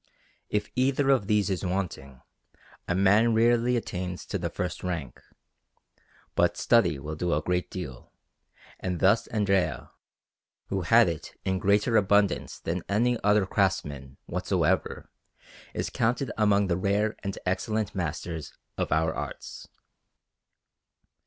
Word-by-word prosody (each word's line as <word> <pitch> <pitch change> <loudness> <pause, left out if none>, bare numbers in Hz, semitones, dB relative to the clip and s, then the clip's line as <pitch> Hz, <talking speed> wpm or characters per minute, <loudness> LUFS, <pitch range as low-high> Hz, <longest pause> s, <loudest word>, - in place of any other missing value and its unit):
If 105 0 -2
either 135 +2 +2
of 120 -8 +2
these 105 -3 +2
is 95 - -2
wanting, 90 -8 -4 0.6
a 90 - 0
man 105 +5 +4
rarely 120 +2 +3
attains 90 -5 -4
to 100 - -3
the 85 -1 -2
first 90 +2 -4
rank; 85 -6 -4 1.1
but - - +2
study 95 -10 +3
will 75 +3 -6
do 85 0 0
a 75 - 0
great 90 +1 -1
deal, 65 -9 -7 0.7
and 90 -2 -3
thus 100 +4 +3
Andrea, 100 -4 0 0.8
who 95 -1 -1
had 115 +4 +5
it 85 -3 -5
in 95 0 0
greater 105 +4 +3
abundance 100 -1 +2
than 85 +2 -3
any 120 +4 +2
other 105 -1 +4
craftsman 75 -9 -1
whatsoever, - - -1 0.7
is - - -2
counted 120 +3 0
among 100 -2 +3
the 85 -3 0
rare 100 +3 +1
and 100 -1 -5
excellent 105 +3 -1
masters 85 -3 -4 0.3
of - - -1
our 80 0 +2
arts. - - -7
95 Hz, 130 wpm, -27 LUFS, 90-110 Hz, 1.1 s, had